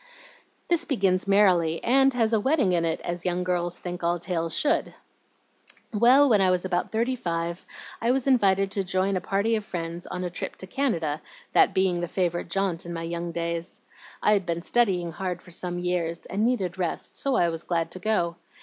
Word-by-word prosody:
"This 340 -1 +2
begins 195 - +1
merrily, 180 -5 +3
and 270 +3 +4
has 230 -2 +1
a 220 - +4
wedding 260 - +2
in 170 -1 +1
it, 165 -1 -1
as 175 0 -4
young 180 0 -1
girls 175 -1 -1
think 175 -1 -6
all 170 +1 +1
tales 165 -2 -2
should. 300 - +1 1.0
Well, 250 +7 +6
when 215 -6 +4
I 190 - +4
was 180 0 +1
about 180 -1 -1
thirty 235 +3 0
five, 170 -4 -3 0.4
I 230 - +1
was 255 0 +1
invited 195 -7 +3
to 195 - 0
join 190 +1 0
a 185 - -1
party 200 +4 0
of 215 - -2
friends 170 -2 -5
on 180 0 -4
a 180 - -3
trip - - -5
to - - -9
Canada, 170 - -1 0.3
that - - +4
being 185 -2 +2
the 175 - -2
favorite 175 -1 -1
jaunt 190 -2 0
in 170 - -6
my 165 0 -4
young 170 +1 -4
days. 170 +1 -4 0.4
I'd 210 -2 +4
been 170 0 -2
studying 185 -7 +1
hard 180 +1 -4
for 180 - -15
some 175 +1 -2
years, 175 -2 -2
and 200 +3 -2
needed 195 -7 0
rest, 175 -2 -2
so 275 -2 0
I 175 - +3
was 165 -1 -4
glad 165 -1 -2
to 185 - -5
go. 180 -4 0
180 Hz, 200 wpm, -26 LUFS, 170-210 Hz, 1.0 s, Well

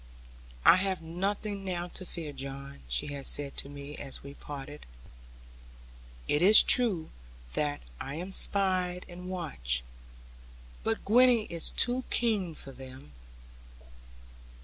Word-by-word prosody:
'I - - +9
have 190 -1 0
nothing 200 +4 -2
now 175 -2 -2
to 185 +1 -7
fear, 160 -3 -5
John,' 140 0 -7
she 60 - -2
had 140 -1 -3
said 140 -1 -1
to 140 - -1
me, 145 +1 -8
as 135 -2 -6
we 140 0 -8
parted; 145 +1 -8 1.4
'it 145 - +2
is 205 +4 +10
true 205 -11 +3 0.4
that 145 -1 -1 0.2
I 135 +2 -5
am 180 +4 -5
spied 185 -2 +1
and 180 +1 -8
watched, 60 - -2 1.0
but 225 0 -1
Gwenny 245 +1 +6
is 170 -1 +1
too 250 +2 0
keen 205 -8 0
for 135 - -9
them. 130 - -11
170 Hz, 125 wpm, -30 LUFS, 140-195 Hz, 1.4 s, is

